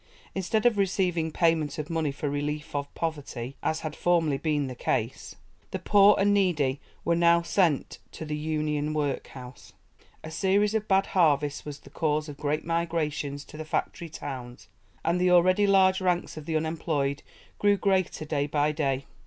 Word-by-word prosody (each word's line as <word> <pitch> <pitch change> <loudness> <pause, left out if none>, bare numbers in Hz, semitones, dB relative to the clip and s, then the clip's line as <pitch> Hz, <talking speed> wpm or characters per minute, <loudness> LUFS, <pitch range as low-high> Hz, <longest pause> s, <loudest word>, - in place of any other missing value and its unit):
Instead 200 +4 -1
of 230 -4 +4
receiving 180 -4 +1
payment 165 -2 +1
of 150 -1 -4
money 160 -3 -1
for 145 +2 -4
relief 150 +1 -3
of 140 0 -3
poverty, 140 -6 -4
as 160 +1 -1
had 155 -1 -5
formerly 165 -5 +1
been 150 -1 0
the 130 - -5
case, 115 -3 -2 0.3
the - - -3
poor 200 +2 +5
and 205 +1 +3
needy 150 -9 +1 0.2
were 170 - +3
now 170 0 +4
sent 170 -4 +1
to 160 - -7
the 150 0 -3
'Union' 150 -1 -1
workhouse. 130 -3 -5 0.5
A 160 - -7
series 200 +5 +2
of 215 -1 -1
bad 195 -1 +3
harvests 150 -5 +1
was 145 -1 -6
the - - -16
cause 155 -1 0
of 145 -2 -8
great 150 +1 -2
migrations 160 -4 -2
to 150 - -12
the 155 - -5
factory 165 +2 -3
towns, 125 -5 -8 0.4
and 170 +2 +1
the 180 - +4
already 185 +3 +5
large 190 -1 +4
ranks 180 -1 0
of 155 -1 -9
the 160 -1 +1
unemployed 155 -3 -1 0.4
grew 205 0 +4
greater 190 -5 0
day 145 -2 -1
by 150 0 +1
day. 140 -3 -1
160 Hz, 170 wpm, -27 LUFS, 145-180 Hz, 0.5 s, poor